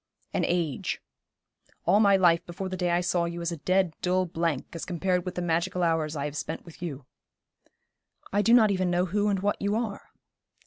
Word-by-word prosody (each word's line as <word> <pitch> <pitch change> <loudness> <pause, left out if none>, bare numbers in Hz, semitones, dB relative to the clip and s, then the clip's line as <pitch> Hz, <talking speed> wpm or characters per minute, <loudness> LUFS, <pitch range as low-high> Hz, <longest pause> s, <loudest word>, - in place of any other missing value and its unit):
'An - - +1
age. 170 -6 -1 0.9
All 205 - +5
my 200 -2 +5
life 170 -2 +4
before 185 +2 -5
the 185 - -3
day 180 -1 0
I 175 +1 +2
saw 175 -1 +1
you 170 0 -4
is 170 0 -2
a 170 - -4
dead, 185 +2 +1
dull 185 +1 +2
blank 165 -4 -1
as 165 - -5
compared 180 0 -1
with 185 - -4
the 180 - -2
magical 170 +1 0
hours 160 -2 +1
I 140 -1 -2
have 145 0 -5
spent 150 +3 -4
with 170 -1 -14
you.' 145 -6 -5 1.3
'I 205 - +3
do 230 +3 +4
not 220 -4 +6
even 185 -2 +1
know 175 +1 +2
who 205 +3 0
and 195 -2 +1
what 205 +1 0
you 200 +1 +1
are.' 220 -3 -3
175 Hz, 210 wpm, -27 LUFS, 165-190 Hz, 1.3 s, not